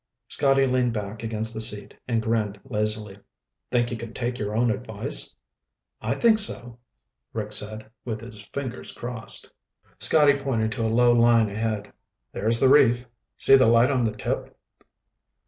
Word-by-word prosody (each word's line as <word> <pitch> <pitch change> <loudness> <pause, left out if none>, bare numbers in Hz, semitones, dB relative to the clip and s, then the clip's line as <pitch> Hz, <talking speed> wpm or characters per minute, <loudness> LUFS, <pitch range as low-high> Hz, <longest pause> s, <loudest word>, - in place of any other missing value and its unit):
Scotty 135 -1 +3
leaned 125 -2 +1
back 105 0 -5
against 110 0 -3
the 110 - -3
seat 105 -2 +3
and 115 -2 0
grinned 110 -3 -1
lazily. 105 -4 -1 0.5
"Think 120 -1 0
you 120 - -3
can 115 0 -9
take 120 0 -3
your 105 0 -3
own 120 +1 +2
advice?" - - -3 0.7
"I - - -1
think 225 -2 +4
so," 120 - -1 0.5
Rick 105 -2 -4
said, 110 +1 -1 0.2
with 110 -3 -5
his 115 -3 -10
fingers 130 +1 -6
crossed. 120 -1 -3 0.5
Scotty 145 -2 +4
pointed 115 -5 -1
to 110 - -4
a 110 - +1
low 120 +2 +4
line 115 -2 +4
ahead. 105 -1 -3 0.4
"There's 115 +3 0
the 135 - +4
reef. 125 -3 +4 0.3
See 135 - +6
the 130 -3 +5
light 115 +3 +4
on 130 -3 +1
the 110 -2 -1
tip?" - - -4
115 Hz, 160 wpm, -24 LUFS, 110-125 Hz, 0.7 s, See